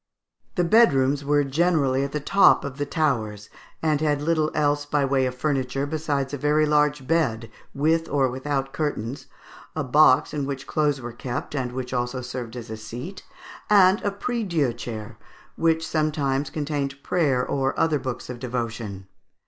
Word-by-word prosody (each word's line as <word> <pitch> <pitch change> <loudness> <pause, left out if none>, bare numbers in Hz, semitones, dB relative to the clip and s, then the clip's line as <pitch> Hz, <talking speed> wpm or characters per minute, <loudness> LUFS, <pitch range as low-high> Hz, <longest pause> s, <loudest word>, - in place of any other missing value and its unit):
The 180 - +2
bedrooms 145 - +4
were 145 +1 +2
generally 140 -2 +1
at 140 - -3
the 150 - -2
top 195 +7 +4
of 140 0 -7
the 145 - -1
towers, 110 - -1 0.3
and 155 -2 +1
had 150 -2 +1
little 155 0 +1
else 145 -1 +1
by 145 -1 0
way 135 -1 +2
of 125 - -4
furniture, 135 -1 -1
besides 145 -2 -2
a 145 - -3
very 150 +2 +3
large 150 -2 +2
bed, 120 -8 0 0.2
with 160 +3 +1
or 135 -2 +2
without 135 +1 -3
curtains, 140 -5 -3 0.5
a 155 - -1
box 140 +1 +4
in 145 -2 -2
which 140 -1 -5
clothes 150 -3 0
were 120 0 -6
kept, 120 +2 -5
and 130 -4 -2
which 125 0 -5
also 125 +1 -1
served 125 -2 -6
as 120 -2 -7
a 110 - -5
seat, 125 - -8 0.5
and 195 -1 +6
a 205 - +1
priedieu 200 - -1
chair, 115 -2 -7 0.4
which 160 -1 +1
sometimes 145 -3 0
contained 140 -2 -3
prayer 140 -8 +1
and 135 0 0
other 155 -3 +2
books 130 -2 -5
of 125 -1 -7
devotion. 115 -5 -4
140 Hz, 165 wpm, -24 LUFS, 125-155 Hz, 0.5 s, and